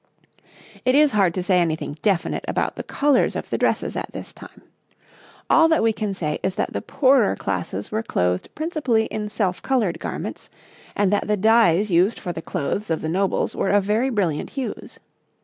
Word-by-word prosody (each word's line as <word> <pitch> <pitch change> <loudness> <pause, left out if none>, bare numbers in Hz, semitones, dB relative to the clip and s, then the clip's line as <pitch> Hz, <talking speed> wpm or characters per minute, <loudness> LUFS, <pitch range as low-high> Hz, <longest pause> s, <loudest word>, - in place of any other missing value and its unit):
It 255 +1 +3
is 300 0 +5
hard 195 -5 +3
to 185 - -2
say 180 0 +3
anything 160 -3 -1
definite 195 -5 0
about - - -1
the - - -5
colours 285 -2 +1
of - - -5
the - - 0
dresses - - 0
at - - -4
this - - -8
time. - - -14 0.8
All 325 0 +5
that 320 -5 +2
we 225 -1 +3
can 210 -2 -3
say 150 -4 -2
is 190 - -2
that - - -2
the - - -2
poorer 260 -5 +3
classes 95 +1 -4
were 215 - -1
clothed 90 - -1
principally 300 -9 0
in 210 -1 -3
self 195 -4 -1
coloured 215 -11 0
garments, - - -6 0.5
and 205 -1 +2
that 205 - 0
the 210 0 +1
dyes 210 -2 +4
used 180 +6 +3
for 175 -3 -4
the 160 - -6
clothes 185 +7 -3
of 160 - -1
the 160 - -3
nobles 190 +3 0
were - - 0
of 205 0 +3
very 220 +6 +1
brilliant 185 - -1
hues. 265 - -5
205 Hz, 190 wpm, -22 LUFS, 175-230 Hz, 0.8 s, is